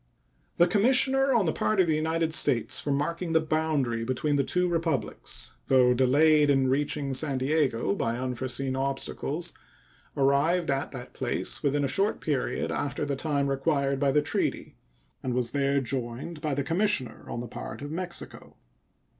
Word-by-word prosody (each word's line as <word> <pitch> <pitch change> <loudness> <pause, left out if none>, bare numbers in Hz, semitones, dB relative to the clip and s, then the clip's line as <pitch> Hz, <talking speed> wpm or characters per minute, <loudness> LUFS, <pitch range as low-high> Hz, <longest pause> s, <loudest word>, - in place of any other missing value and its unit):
The 175 - +6
commissioner 265 +6 +3
on 230 -6 +3
the 160 - 0
part 215 -2 0
of 185 - +6
the 160 -2 +1
United 160 +1 0
States 120 -7 +2
for - - -4
marking 165 +4 -1
the 160 - +5
boundary 155 -7 0
between 130 +5 -1
the 140 - +2
two 180 +6 0
Republics, 165 -9 -3
though 125 -2 +5
delayed 145 +4 +4
in 135 -2 +3
reaching 140 0 -1
San 135 0 0
Diego 130 -6 +1
by 115 +3 -1
unforeseen 130 +1 -2
obstacles, 140 +4 -2 0.6
arrived 140 +5 +2
at 135 0 -1
that 125 -3 -9
place - - -2
within 145 0 +1
a - - +1
short 195 +10 +1
period 140 -5 -2
after 145 0 -2
the 140 -1 -2
time 140 0 -1
required 140 0 0
by 140 -1 +2
the 150 +2 +2
treaty, - - -2 0.5
and 125 -2 -2
was 125 -2 +1
there 140 0 +1
joined 130 +5 -4
by 150 -2 -1
the 140 - -1
commissioner 165 - 0
on - - -4
the 120 - -5
part 120 - -7
of 145 - -6
Mexico. 175 +1 -6
140 Hz, 165 wpm, -27 LUFS, 130-160 Hz, 0.6 s, The